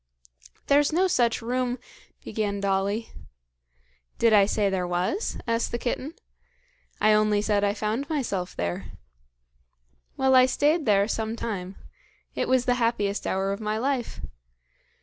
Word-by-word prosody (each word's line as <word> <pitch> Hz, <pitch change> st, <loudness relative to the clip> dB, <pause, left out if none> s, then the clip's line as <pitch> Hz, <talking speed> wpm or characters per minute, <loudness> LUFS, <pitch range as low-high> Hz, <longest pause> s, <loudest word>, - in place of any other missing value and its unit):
"There's 285 Hz, +1 st, +3 dB
no 365 Hz, +4 st, +3 dB
such 240 Hz, -10 st, +1 dB
room 250 Hz, +1 st, -1 dB, 0.2 s
" -, -, -30 dB
began 205 Hz, -3 st, -2 dB
Dolly. 200 Hz, +3 st, -1 dB, 1.1 s
"Did 230 Hz, -1 st, +3 dB
I 200 Hz, -2 st, +6 dB
say 210 Hz, -1 st, +1 dB
there 190 Hz, -2 st, -1 dB
was?" 180 Hz, -, -1 dB
asked 230 Hz, 0 st, -1 dB
the 235 Hz, -, -1 dB
kitten. 260 Hz, +6 st, -3 dB, 0.8 s
"I 215 Hz, +1 st, +4 dB
only 210 Hz, -1 st, +3 dB
said 205 Hz, -1 st, +1 dB
I 205 Hz, 0 st, +1 dB
found 220 Hz, +7 st, -2 dB
myself 205 Hz, -, -2 dB
there. 85 Hz, 0 st, -4 dB, 1.2 s
Well, 265 Hz, 0 st, +3 dB
I 255 Hz, 0 st, +7 dB
stayed 295 Hz, +3 st, +1 dB
there 200 Hz, -1 st, +4 dB
some 220 Hz, 0 st, -2 dB
time. 195 Hz, -5 st, -5 dB, 0.6 s
It -, -, -2 dB
was 255 Hz, -1 st, +2 dB
the 245 Hz, -, +3 dB
happiest 210 Hz, -3 st, 0 dB
hour 195 Hz, +1 st, 0 dB
of 200 Hz, +2 st, -4 dB
my 215 Hz, 0 st, -1 dB
life. 255 Hz, 0 st, -2 dB
220 Hz, 145 wpm, -26 LUFS, 200-255 Hz, 1.2 s, I